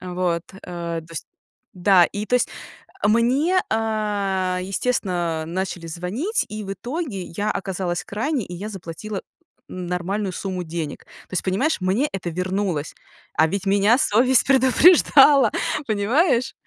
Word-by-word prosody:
Вот, 180 -2 -1 0.2
а, 170 -2 -4
то 160 - -16
есть. 165 - -6 0.5
Да, 185 -1 +5
и, 205 +4 -4
то 250 - 0
есть. 250 - +2 0.6
Мне, 260 - +3
а, 205 -4 0
естественно, 180 -6 -1
начали 180 -1 -4
звонить, 200 - -2
и 215 0 -6
в 195 0 -4
итоге 250 - -4
я 205 +6 -3
оказалась 180 -2 -3
крайней, 235 - -2
и 180 - -9
я 205 +5 -6
заплатила 195 +2 -6 0.5
нормальную 185 +2 -3
сумму 185 -2 -4
денег. 160 -3 -5 0.2
То - - -29
есть, 180 - 0
понимаешь, 200 +9 0
мне 200 +11 +1
это 185 -2 -3
вернулось. 180 -2 -2 0.4
А 160 - +3
ведь 195 +3 -3
меня 200 +4 +4
совесть 250 +1 +3
предупреждала! 275 +1 +6 0.4
Понимаешь? 240 - +2
195 Hz, 135 wpm, -22 LUFS, 180-235 Hz, 0.6 s, предупреждала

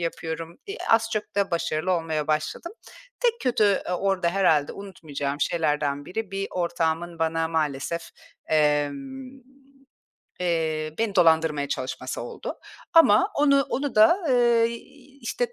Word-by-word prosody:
yapıyorum. 165 0 -4
İii, 405 +4 -6
az 225 0 +4
çok 215 -1 -3
da 200 -1 +1
başarılı 170 +1 -1
olmaya 160 -3 -1
başladım. 155 - -2 0.5
Tek 475 -1 +1
kötü, 245 -4 +2 0.2
eee, - - -2
orada 185 -1 0
herhâlde 165 -6 +2
unutmayacağım 150 -7 -5
şeylerden 150 -4 0
biri; 215 +1 -5
bir 195 0 -3
ortağımın 170 -1 -2
bana 165 0 0
maalesef, 160 +1 -2 0.4
emm, 155 - 0 1.1
eee, 160 -3 -1
beni 220 -3 -1
dolandırmaya 160 -5 +3
çalışması 130 - -4
oldu. - - -6 0.4
Ama 350 +4 +6
onu 280 -1 +4
onu 280 +1 -2
da, 220 - +6
eee, 240 -2 +4 0.5
işte, 485 -1 -2
170 Hz, 125 wpm, -25 LUFS, 155-225 Hz, 1.1 s, Ama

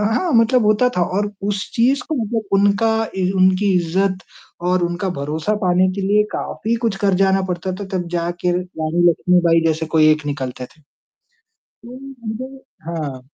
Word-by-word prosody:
हाँ 355 +4 0
मतलब 230 0 +4
होता 215 +4 +3
था - - +2 0.2
और 205 0 -1 0.2
उस 200 -1 -3
चीज़ 260 +5 +2
को 310 - 0
मतलब 220 +1 -2
उनका 205 +3 +3 0.3
इ 185 -1 +1
उनकी 190 +1 +3
इज़्ज़त 185 +3 0 0.5
और 180 -1 +2
उनका 175 +2 -2
भरोसा 155 +8 -2
पाने 180 +1 +3
के 200 - -3
लिए 205 +2 +3
काफ़ी 230 +2 -2
कुछ 210 -4 0
कर 195 - +3
जाना 190 0 +2
पड़ता 180 +1 -3
था। 200 - -5
तब 175 -1 -4
जाके 175 +1 -1
र 175 - +1 0.2
रानी 170 +3 +2
लक्ष्मीबाई 170 -1 +3
जैसे 160 0 -1
कोई 155 -1 +6
एक 150 -1 -1
निकलते 130 -3 -4
थे। 155 +4 -23 0.8
तो 250 +2 -14 0.3
मुझे 260 +5 -6 0.3
हाँ। 150 -6 -4
185 Hz, 170 wpm, -19 LUFS, 170-210 Hz, 0.8 s, कोई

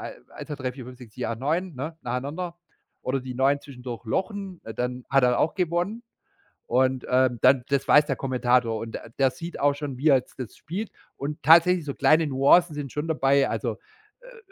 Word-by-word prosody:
ei - - -7 0.2
1, - - -9
2, 150 - -3
3, 130 -2 -3
4, 130 -1 -10
5, 125 0 -11
6, 115 -4 -14
7, 125 - -3
8, 115 - -4
9, 165 +6 -1
ne, 155 +5 -5
nacheinander 145 +8 -4 0.4
oder 130 +1 -1
die 125 0 -7
9 135 +3 +2
zwischendurch 125 -4 -9
lochen, 190 - -3
äh, 110 - -8
dann 125 0 -3
hat 135 0 +3
er 125 -1 +3
auch 160 - +1
gewonnen. 180 +5 -1 0.7
Und, 130 +1 +1
ähm, 125 -2 +2
dann 130 -1 +5
das 140 -1 0
weiß 150 0 +6
der 135 -4 -1
Kommentator 125 -3 +1
und 115 +1 -6
der - - -8
der 135 -1 +3
sieht 170 +5 -8
auch 145 0 +3
schon, 140 -2 -6
wie 150 +5 +2
er 135 - +7
jetzt 125 - -8
das 125 -4 -7
spielt. 195 +7 -5 0.2
Und 150 +2 -5
tatsächlich 170 +3 +5
so 140 - -3
kleine 155 0 +4
Nuancen 145 +5 +4
sind 145 -3 -5
schon 150 +2 -3
dabei, 140 -3 +3
also, - - -2 0.4
äh, - - -17
äh, - - -14
135 Hz, 215 wpm, -25 LUFS, 125-160 Hz, 0.7 s, er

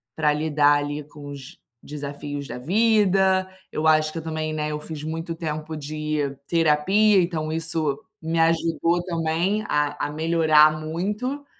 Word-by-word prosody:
pra 150 -2 +2
lidar, 150 -1 +3
ali, 145 +1 -3
com 145 -1 -12
os 135 -2 -10 0.2
desafios 145 -1 -6
da - - -6
vida. 190 - +2 0.2
Eu 155 +1 -1
acho 155 0 +4
que 165 - -4
eu - - -6
também, 155 -1 -3
né, 150 0 -2
eu 150 - -3
fiz 150 -1 -8
muito 165 +1 -4
tempo 155 -1 -4
de 150 -1 -3
terapia, 180 +6 +4
então 160 -3 -2
isso 160 +1 -1 0.2
me 165 +1 -1
ajudou 165 +1 +2
também 170 +4 -1
a 145 0 0
a - - -7
melhorar 155 -1 +4
muito. 210 - -3
155 Hz, 150 wpm, -24 LUFS, 150-170 Hz, 0.2 s, acho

